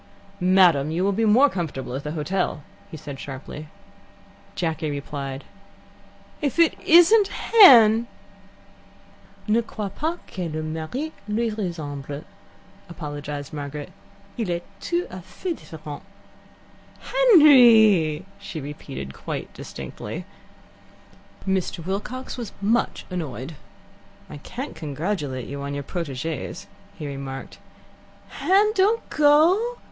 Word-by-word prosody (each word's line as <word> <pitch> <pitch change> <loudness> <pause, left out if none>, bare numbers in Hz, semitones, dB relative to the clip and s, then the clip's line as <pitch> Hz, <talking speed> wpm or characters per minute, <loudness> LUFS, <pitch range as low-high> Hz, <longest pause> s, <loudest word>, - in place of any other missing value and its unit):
"Madam, 180 -6 +4
you 170 +3 -1
will 200 - +2
be 225 +3 +1
more 235 +7 +6
comfortable 160 - -4
at 135 +2 -4
the 150 - -4
hotel," 165 -1 -2 0.3
he 160 - -8
said 140 -2 -8
sharply. 145 +2 -8 0.9
Jacky 160 -2 -2
replied: 140 -1 -5 1.0
"If 285 -1 -1
it 335 -2 +5
isn't 360 +5 +6
Hen!" 235 - +7 1.4
"Ne 220 +2 +3
crois 215 -3 -5
pas 320 - -2
que 180 -3 -5
le 155 0 -4
mari 160 - -4 0.2
lui 225 +2 0
ressemble," 150 -8 -5 0.7
apologized 145 -3 -6
Margaret. 145 0 -6 0.5
"Il 220 -5 -1
est 175 0 -2 0.2
tout 350 +1 -1
a 185 - -7
fait 340 - -5
different." 155 -2 -9 1.0
"Henry!" 235 - +6
she 160 - -7
repeated, 140 - -7
quite - - -6
distinctly. 65 -2 -7 1.2
Mr. 190 -3 -1
Wilcox 230 +9 -4
was 230 -4 -6
much 220 +4 0
annoyed. 155 -4 -5 0.8
"I - - -7
can't 255 - -7
congratulate 150 - -3
you 140 0 -6
on 140 0 -4
your 145 - -4
proteges," 160 +3 -5 0.3
he 155 - -6
remarked. 135 -1 -7 0.7
"Hen, 405 +3 +3
don't 425 +3 +2
go. 330 +11 +4
175 Hz, 110 wpm, -24 LUFS, 145-235 Hz, 1.4 s, Hen